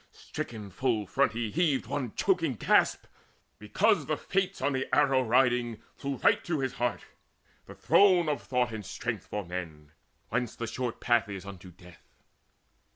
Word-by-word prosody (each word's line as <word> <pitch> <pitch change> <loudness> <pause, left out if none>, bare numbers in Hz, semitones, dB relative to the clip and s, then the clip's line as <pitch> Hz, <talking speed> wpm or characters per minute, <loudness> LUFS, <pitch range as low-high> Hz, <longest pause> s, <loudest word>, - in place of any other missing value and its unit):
Stricken 105 -4 -7
full 115 -1 0
front 135 +8 +1
he 115 -2 -3
heaved 155 -3 +1
one 130 -6 -4
choking 165 -9 +1
gasp, - - +2 0.5
Because - - +1
the - - 0
fates 195 -1 -1
on 140 +1 0
the 130 0 -1
arrow 135 -3 +4
riding 120 -2 +2 0.2
flew 140 -1 -4
Right - - +2
to 170 -2 -1
his 130 -1 -2
heart, 120 0 -2 0.6
the - - -11
throne 185 -4 +4
of 150 -2 -1
thought 125 -2 0
and 110 -2 -6
strength - - -5
For 105 -2 -4
men, 80 -4 -7 0.4
whence 120 0 -2
short 125 -3 -3
the - - -15
path 120 -3 +3
is 95 -1 -7
unto 95 -2 -10
death. 90 -1 -16
120 Hz, 160 wpm, -29 LUFS, 105-140 Hz, 0.6 s, arrow